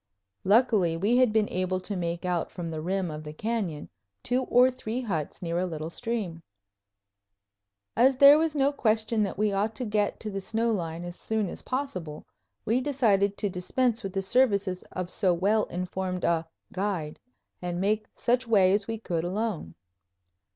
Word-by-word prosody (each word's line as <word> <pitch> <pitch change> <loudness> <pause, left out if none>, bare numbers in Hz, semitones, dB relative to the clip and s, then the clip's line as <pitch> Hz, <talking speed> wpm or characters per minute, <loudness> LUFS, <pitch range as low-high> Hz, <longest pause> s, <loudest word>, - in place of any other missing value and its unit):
Luckily 200 -5 +3
we 210 +8 +2
had 255 -3 +4
been 215 -1 +2
able 185 0 -1
to 200 +2 -3
make 170 0 -3
out 175 -2 -1
from 175 -2 -5
the 160 -1 -4
rim 185 0 -1
of 155 0 -7
the 150 0 -8
canyon 200 -5 -3 0.4
two 250 +1 +1
or 250 +1 +5
three 250 -2 -4
huts 175 - -4
near 170 0 -1
a 185 - 0
little 160 -1 -5
stream. 205 -7 -3 1.5
As 255 +2 +4
there 280 +2 +9
was 320 -1 0
no 280 0 +3
question 220 -4 +1
that 200 -2 -1
we 210 0 +2
ought 210 +3 0
to 250 - -3
get 210 -1 0
to 215 - -3
the 195 0 -4
snow 225 +4 0
line 170 -4 -3
as 175 0 -7
soon 220 -2 -1
as - - -7
possible, 185 - -4 0.4
we 235 +4 +2
decided 210 -8 +2
to 205 - 0
dispense 230 +6 0
with 195 -4 -5
the 195 - -1
services 200 -4 +2
of 185 -1 -4
so 185 -4 +2
well 205 +5 +2
informed 180 0 -4
a 165 -1 +1 0.3
"guide," 185 -6 -2 0.4
and 175 -1 -3
make 210 +3 0
such 245 +1 +1
way 195 -4 +5
as 205 0 0
we 225 0 -3
could 170 -7 -2
alone. 185 - -3
200 Hz, 180 wpm, -27 LUFS, 175-230 Hz, 1.5 s, there